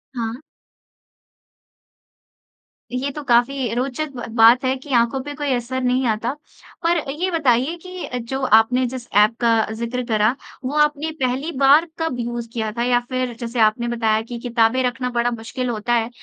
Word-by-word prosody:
हाँ। 230 Hz, -1 st, -2 dB, 2.6 s
ये 255 Hz, +3 st, -2 dB
तो 300 Hz, -, -7 dB
काफ़ी 245 Hz, -1 st, +2 dB
रोचक 270 Hz, +4 st, -2 dB
ब 240 Hz, -, -5 dB
बात 235 Hz, +3 st, +6 dB
है 260 Hz, -, +2 dB
कि 265 Hz, +2 st, -14 dB
आँखों 235 Hz, +2 st, +2 dB
पे 290 Hz, -, -6 dB
कोई 285 Hz, -2 st, -1 dB
असर 250 Hz, +2 st, -2 dB
नहीं 250 Hz, +1 st, +1 dB
आता। 225 Hz, +2 st, 0 dB, 0.5 s
पर 340 Hz, +1 st, +3 dB
ये 345 Hz, +6 st, -2 dB
बताइए 280 Hz, -1 st, +2 dB
कि 365 Hz, -9 st, -5 dB
जो 265 Hz, +3 st, -4 dB
आपने 235 Hz, +3 st, +4 dB
जिस 245 Hz, -1 st, -7 dB
ऐप 210 Hz, +2 st, +5 dB
का 230 Hz, -2 st, +3 dB
ज़िक्र 235 Hz, +2 st, -3 dB
करा, 220 Hz, +1 st, +2 dB, 0.3 s
वो 285 Hz, +4 st, -2 dB
आपने 300 Hz, +1 st, +1 dB
पहली 260 Hz, +6 st, -1 dB
बार 280 Hz, +4 st, +6 dB
कब 325 Hz, -7 st, -2 dB
यूज़ 235 Hz, 0 st, -4 dB
किया 220 Hz, -2 st, -2 dB
था? 235 Hz, +2 st, -2 dB
या 245 Hz, 0 st, +3 dB
फिर 255 Hz, -1 st, -2 dB
जैसे 235 Hz, 0 st, -4 dB
आपने 220 Hz, +2 st, +3 dB
बताया 225 Hz, -2 st, +1 dB
कि 235 Hz, +1 st, -7 dB
किताबें 235 Hz, +1 st, +2 dB
रखना 250 Hz, 0 st, -1 dB
बड़ा 240 Hz, 0 st, 0 dB
मुश्किल 240 Hz, +2 st, -4 dB
होता 230 Hz, +1 st, -1 dB
है 230 Hz, 0 st, +1 dB
245 Hz, 170 wpm, -21 LUFS, 230-265 Hz, 2.6 s, बात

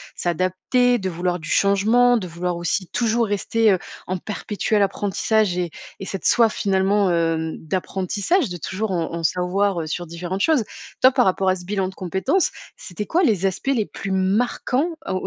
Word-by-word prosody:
s'adapter, 185 Hz, +8 st, +1 dB
de 190 Hz, -4 st, -3 dB
vouloir 180 Hz, +1 st, -2 dB
du 155 Hz, -, -8 dB
changement, 220 Hz, +5 st, +4 dB
de 190 Hz, -5 st, -4 dB
vouloir 175 Hz, +1 st, -3 dB
aussi 175 Hz, +2 st, -2 dB
toujours 235 Hz, +1 st, +1 dB
rester, 210 Hz, +1 st, +2 dB
heu, 185 Hz, -, 0 dB, 0.3 s
en 185 Hz, -, -1 dB
perpétuel 210 Hz, +2 st, -2 dB
apprentissage 200 Hz, 0 st, +1 dB
et 175 Hz, -2 st, -2 dB, 0.3 s
et 195 Hz, -, -6 dB
cette 195 Hz, -3 st, -6 dB
soif 230 Hz, -2 st, +4 dB
finalement, 195 Hz, 0 st, +2 dB
hem, 165 Hz, -1 st, 0 dB
d'apprentissage, 195 Hz, -, -1 dB
de 175 Hz, -, -5 dB
toujours 195 Hz, +5 st, -3 dB
en 170 Hz, -3 st, -1 dB
en 170 Hz, 0 st, -4 dB
savoir, 180 Hz, +2 st, +1 dB
heu, 155 Hz, -, -5 dB
sur 175 Hz, +2 st, -4 dB
différentes 175 Hz, +3 st, -4 dB
choses. 305 Hz, -4 st, +3 dB, 0.4 s
Toi, 260 Hz, -, +7 dB
par 255 Hz, -2 st, +3 dB
rapport 190 Hz, 0 st, +2 dB
à 185 Hz, -, +3 dB
ce 180 Hz, -1 st, -10 dB
bilan 195 Hz, 0 st, -1 dB
de 190 Hz, -, -12 dB
compétence, 190 Hz, -, 0 dB, 0.3 s
c'était 205 Hz, +3 st, -6 dB
quoi 345 Hz, -, +2 dB
les 205 Hz, -, +2 dB
aspects 190 Hz, +8 st, -5 dB
les 225 Hz, -5 st, 0 dB
plus 195 Hz, -, -6 dB
marquants 235 Hz, -, +1 dB, 0.2 s
au -, -, -1 dB
190 Hz, 180 wpm, -22 LUFS, 180-220 Hz, 0.4 s, Toi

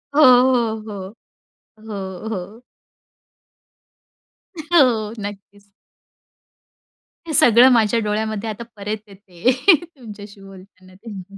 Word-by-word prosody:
हो, 305 Hz, -, +4 dB
हो, 245 Hz, -3 st, +4 dB
हो, 195 Hz, -1 st, -8 dB, 0.7 s
हो, 200 Hz, -2 st, -8 dB
हो. 215 Hz, +3 st, -7 dB, 2.0 s
हो. 255 Hz, -10 st, +2 dB
नक्कीच. 205 Hz, 0 st, -10 dB, 1.6 s
हे 315 Hz, -, -5 dB
सगळं 245 Hz, 0 st, +6 dB
माझ्या 230 Hz, -1 st, +2 dB
डोळ्यामध्ये 215 Hz, 0 st, -3 dB
आता 215 Hz, +2 st, -7 dB
परत 210 Hz, +1 st, -5 dB
येते 195 Hz, +2 st, -3 dB, 0.3 s
तुमच्याशी 210 Hz, -, -13 dB
बोलताना 185 Hz, -1 st, -16 dB
तेव्हा. 200 Hz, -2 st, -11 dB
215 Hz, 90 wpm, -19 LUFS, 200-235 Hz, 2.0 s, सगळं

